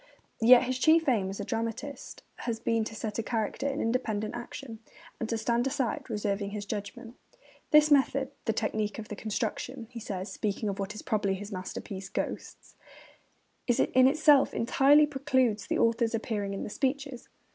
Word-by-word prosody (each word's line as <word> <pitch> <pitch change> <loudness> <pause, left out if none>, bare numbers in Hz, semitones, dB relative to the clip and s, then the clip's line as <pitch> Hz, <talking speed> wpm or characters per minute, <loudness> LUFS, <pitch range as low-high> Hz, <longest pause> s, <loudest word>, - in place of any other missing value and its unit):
Yet 240 +2 +8
his 255 0 -2
chief 320 +2 +4
aim 210 -8 +2
as 195 - -6
a - - -3
dramatist 230 +5 -5
has 230 -2 -3
been 230 -1 +1
to 220 - -7
set 220 +1 -3
character 225 +4 -2
in 280 +1 -2
independent 225 -3 -1
action, 240 -1 -8 0.4
and 225 - -3
to 230 - 0
stand 235 +3 +1
aside, 265 +1 -2
reserving 205 -2 -2
his 205 0 -5
judgment. 210 +4 -6 0.5
'The 300 0 +6
method, 275 -1 +3
the 225 - +2
technique 215 -1 -2
of 220 -1 -8
the 210 - -5
construction,' 230 +4 -3
he 240 - -7
says, 195 -2 -5
speaking 210 0 -2
of 195 +1 -4
what 200 +2 -4
is - - -8
probably 205 -3 0
his 205 +2 -8
masterpiece, 190 0 -6
Ghosts, - - -5 0.9
'in 255 +1 +4
itself 290 -1 +4
entirely 275 +5 +5
precludes 260 -6 0
the - - 0
author's 230 0 +2
appearing 205 -3 -2
in - - -4
the - - -6
speeches. 270 -1 -2
230 Hz, 170 wpm, -29 LUFS, 210-260 Hz, 0.9 s, Yet